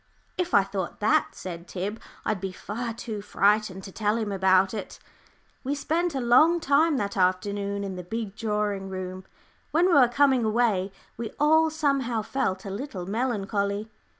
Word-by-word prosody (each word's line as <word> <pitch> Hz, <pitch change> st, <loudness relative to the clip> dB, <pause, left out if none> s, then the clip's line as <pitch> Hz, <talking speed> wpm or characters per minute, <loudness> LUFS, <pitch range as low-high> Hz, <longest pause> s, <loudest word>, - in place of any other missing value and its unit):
"If 360 Hz, -1 st, -1 dB
I 200 Hz, -, +6 dB
thought 195 Hz, 0 st, -5 dB
that," 215 Hz, +1 st, +2 dB
said 175 Hz, -1 st, -7 dB
Tib, 200 Hz, +5 st, -4 dB, 0.3 s
"I'd 215 Hz, -4 st, -1 dB
be 195 Hz, -1 st, -3 dB
far 230 Hz, +6 st, -5 dB
too 220 Hz, -2 st, -6 dB
frightened 205 Hz, -1 st, +1 dB
to 195 Hz, -, -8 dB
tell 210 Hz, +2 st, 0 dB
him 215 Hz, -3 st, -2 dB
about 190 Hz, 0 st, +3 dB
it." 210 Hz, -3 st, -6 dB, 0.7 s
We 280 Hz, +2 st, -1 dB
spent 325 Hz, +3 st, -1 dB
a -, -, 0 dB
long 260 Hz, +8 st, +5 dB
time 300 Hz, 0 st, +3 dB
that 200 Hz, -3 st, -2 dB
afternoon 200 Hz, +2 st, 0 dB
in 190 Hz, -2 st, -5 dB
the 180 Hz, -, -6 dB
big 215 Hz, +2 st, -5 dB
drawing 210 Hz, -3 st, -2 dB
room. 185 Hz, 0 st, -6 dB, 0.4 s
When 335 Hz, +3 st, +3 dB
we 365 Hz, -, +3 dB
were 270 Hz, -5 st, +7 dB
coming 265 Hz, 0 st, +3 dB
away, 215 Hz, -4 st, +1 dB, 0.3 s
we 230 Hz, -1 st, -4 dB
all 315 Hz, +2 st, +5 dB
somehow 275 Hz, -7 st, 0 dB
felt 190 Hz, -6 st, -2 dB
a 195 Hz, -, -5 dB
little 200 Hz, -4 st, -5 dB
melancholy. 205 Hz, -1 st, -1 dB
210 Hz, 170 wpm, -26 LUFS, 195-255 Hz, 0.7 s, were